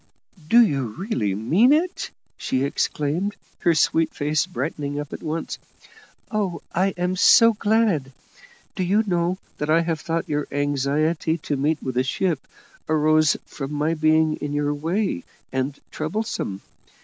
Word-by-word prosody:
"Do 235 +6 +7
you 135 - -1
really 120 - -1
mean 170 - +4
it?" 340 +5 +1 0.3
she 130 0 -1
exclaimed, 150 +7 -1 0.2
her 170 -2 +3
sweet 160 +1 +2
face 155 +3 0
brightening 145 -3 -3
up 145 -1 -6
at - - -6
once. 160 +1 -4 0.7
"Oh, 205 -5 -2
I 190 +2 +1
am 180 +1 0
so 230 +4 +7
glad! 205 -10 +1 0.6
Do - - -3
you 200 +5 +2
know 175 -1 0 0.2
I 155 +3 +3
have 165 -2 -1
thought 165 0 -2
your 150 -1 -1
anxiety 145 +3 0
to 150 -2 -3
meet 150 +3 0
with 130 -2 -3
a 130 - +3
ship 160 +2 -1 0.4
arose 155 0 +3
from 135 0 -6
my 150 +2 0
being 155 0 +3
in 145 0 -4
your 145 0 0
way, 165 - -1 0.3
and 135 +2 -2
troublesome. 155 - -3
155 Hz, 145 wpm, -23 LUFS, 145-180 Hz, 0.7 s, Do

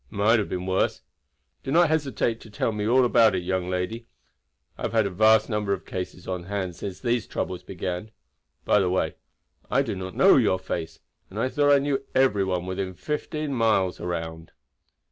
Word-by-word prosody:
"It - - -12
might 110 +3 +4
have 105 - -2
been 90 0 -3
worse. 95 0 0 0.6
Do 135 - -4
not 170 +1 +5
hesitate 135 -7 0
to 110 - -13
tell 110 +2 -1
me 105 -1 -2
all 125 +2 +4
about 115 -4 +4
it, 90 - -2
young 90 0 -1
lady. 95 +6 -3 0.7
I - - -14
have - - -2
had 110 -2 +3
a 100 - -2
vast 110 +3 +4
number 105 -3 -1
of - - -5
cases 90 -1 -6
on 90 -2 -4
hand 95 -3 -3
since 95 0 -6
these 120 -2 0
troubles 90 -1 -3
began. 90 +2 -5 0.6
By 105 - +4
the 95 -2 +1
way, 95 - 0 0.6
I - - +3
do - - -3
not 95 -1 -6
know - - +6
your 95 - +3
face, 80 -3 -5 0.3
and 95 - -10
I 130 - +1
thought 145 +1 +2
I 140 - +7
knew 140 -1 -1
every 130 -7 +3
one 90 -2 -1
within 95 0 -4
fifteen 150 - -3
miles 110 -6 +1
around." 80 -2 -5
100 Hz, 200 wpm, -25 LUFS, 90-120 Hz, 0.7 s, I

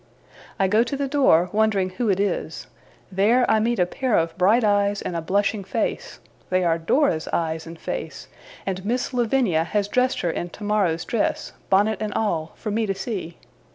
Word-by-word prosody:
I 195 - +3
go 210 +4 +3
to 245 +4 -2
the 280 0 -1
door, 260 - +3
wondering 205 -3 +1
who 220 +4 -2
it 195 -1 +2
is; 185 -5 -2 0.5
there, 220 +7 +3
I 220 - +3
meet 235 +2 0
a 180 - +3
pair 245 +5 0
of 165 0 0
bright 205 +6 +3
eyes, 205 -1 +2
and 175 - -4
a 165 - -1
blushing 200 +4 0
face; 195 +4 -3 0.3
they 185 0 +1
are 165 -1 +1
Dora's 165 - +1
eyes 160 -1 -2
and 165 0 -9
face, - - -6 0.4
and 190 -1 -3
Miss 245 +5 -2
Lavinia 235 -9 +2
has 200 +4 -1
dressed 250 +4 +1
her 170 - 0
in 175 - -4
tomorrow's 200 -4 -1
dress, 230 - -1 0.2
bonnet 205 +2 +2
and 210 -1 -3
all, 170 -8 -1
for 215 - -5
me 220 +1 0
to 195 - -1
see. 190 -4 -5
200 Hz, 190 wpm, -23 LUFS, 180-225 Hz, 0.5 s, I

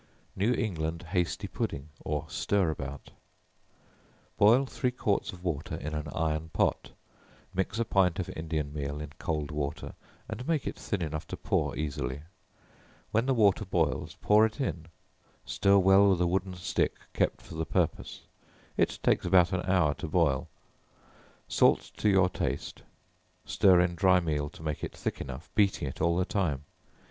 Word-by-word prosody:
New 105 +5 +2
England 85 -7 -2
Hasty 90 -1 -1
Pudding, 70 +2 -4
or 75 -1 -2
Stir 100 -5 +1
about. 70 -2 -7 1.2
Boil 120 +7 +5
three 130 -1 -1
quarts 110 -5 -1
of 90 -1 -12
water 80 -5 -2
in 75 +1 -5
an 75 0 -3
iron 80 0 -1
pot; - - 0 0.6
mix 95 +3 -1
a 115 - +1
pint 95 -5 +2
of 90 - -2
Indian 80 -2 -3
meal 70 0 -4
in 75 -1 -6
cold 75 -2 -2
water, 75 -1 -4 0.3
and 125 - -6
make 160 -4 0
it - - -3
thin 100 -5 -3
enough 80 -1 -4
to - - -6
pour - - 0
easily; 70 -2 -3 0.9
when 115 +4 +1
the 135 - +3
water 105 -3 +4
boils, 85 -6 -1
pour 105 +1 +5
it 110 +5 0
in; 85 - -3 0.6
stir 100 0 +3
well 95 +1 +6
with 90 -2 +2
a - - +4
wooden 95 +1 -1
stick 90 - -1 0.2
kept - - +1
for - - -13
the 80 0 -2
purpose; 80 - -1 0.6
it - - +1
takes - - +3
about 90 -1 +5
an 95 - 0
hour 90 -6 +3
to 80 - -6
boil; 75 -5 +1 1.0
salt - - +3
to 105 - +2
your 95 -2 +5
taste; 90 - -3 0.6
stir 95 -3 +5
in 90 0 +2
dry 90 +1 +4
meal 75 -4 -1
to 80 - -13
make 75 -2 -3
it - - -5
thick - - -3
enough, 65 +4 -8
beating 100 -8 +2
it 65 - -6
all 85 0 +2
the 90 - +2
time. 80 -10 -1
85 Hz, 165 wpm, -29 LUFS, 75-95 Hz, 1.2 s, well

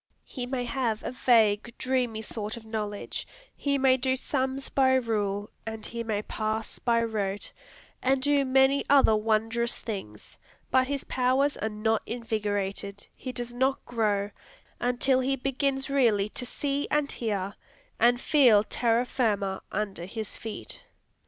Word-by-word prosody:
He 250 -2 -5
may 250 -1 -2
have 235 -3 -1
a - - -3
vague, 235 -2 +3
dreamy 250 -4 -1
sort 215 +1 -5
of 225 - -11
knowledge; 210 -2 -4 0.3
he 280 -1 0
may 265 -1 +4
do 260 0 +1
sums 265 0 -1
by 260 -1 +3
rule, 210 -5 -1
and 220 -1 -6
he 235 0 -4
may 215 -2 -2
parse 215 +1 -3
by 230 -1 +2
rote, 205 -3 -2 0.5
and 265 +1 +2
do 285 +1 +3
many 265 +1 +4
other 275 -6 +6
wondrous 225 +2 +1
things; 150 - -7 0.3
but 260 0 +4
his 280 0 -2
powers 260 +3 +1
are 220 - -2
not 220 +1 0
invigorated, 205 -3 -2
he 255 - -6
does 240 -1 -4
not 265 +2 0
grow, 210 -4 0 0.5
until 250 +2 +2
he 265 +1 +1
begins 270 +1 0
really 230 -7 +2
to 250 +3 -3
see 285 +2 -2
and 295 -1 +1
hear, 200 -4 -2 0.5
and 245 +1 +4
feel 245 -8 +5
terra 235 +2 +1
firma 205 -7 0
under 195 -4 -3
his 215 +2 -5
feet. 220 -2 -7
235 Hz, 145 wpm, -28 LUFS, 215-260 Hz, 0.5 s, other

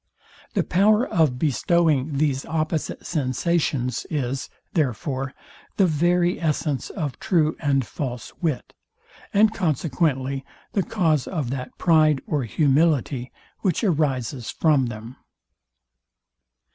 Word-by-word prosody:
The - - +3
power 210 +7 +3
of 155 -7 +2
bestowing 150 0 +2
these 140 -2 +1
opposite 155 -1 -2
sensations 140 -2 0
is, 135 -3 -2 0.2
therefore, 135 -2 -1 0.4
the 195 - +5
very 175 +2 +2
essence 150 -4 -1
of 150 - -4
true 160 -3 +2
and 140 -4 +1
false 125 -5 -5
wit; 155 -7 -2 0.6
and 215 +2 +4
consequently 140 - 0 0.3
the 200 - +1
cause 160 - +1
of 150 -9 -2
that 130 -1 -5
pride 155 -4 +4
or 145 -5 -1
humility, 140 0 +1 0.3
which 185 -1 0
arises 135 - 0
from 145 -6 +2
them. 115 +2 -8
150 Hz, 110 wpm, -24 LUFS, 130-170 Hz, 0.6 s, the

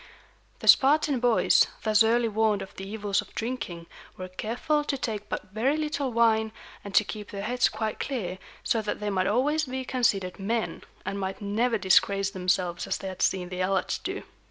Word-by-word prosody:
The - - -6
Spartan 285 0 +5
boys, 240 -2 +4 0.2
thus 215 -1 +4
early 230 +1 +4
warned 215 -1 +1
of 190 - -12
the 195 0 -7
evils 205 -2 0
of - - -16
drinking, 220 -8 -4 0.3
were 185 0 -6
careful 245 +11 -1
to 285 -1 -2
take 215 -5 -4
but - - -5
very 250 +8 +1
little 300 -3 -2
wine, 220 -1 +3 0.3
and 200 -1 -7
to - - +7
keep 210 0 -7
their 200 -1 -5
heads 245 +3 +2
quite 220 -1 -3
clear, 190 -9 -3 0.2
so 225 - +1
that 210 - -3
they 210 0 -2
might 185 -1 +1
always 295 +8 +2
be 260 0 -4
considered 200 -9 0
men, 220 +3 -2 0.2
and 200 - -3
might 190 0 -3
never 225 +4 0
disgrace 195 +1 +3
themselves 180 -2 -1
as - - -1
they 190 - -5
had 185 - -8
seen 180 -2 +1
the 180 0 -5
Helots 185 0 0
do. 385 +2 -5
215 Hz, 190 wpm, -27 LUFS, 195-245 Hz, 0.3 s, to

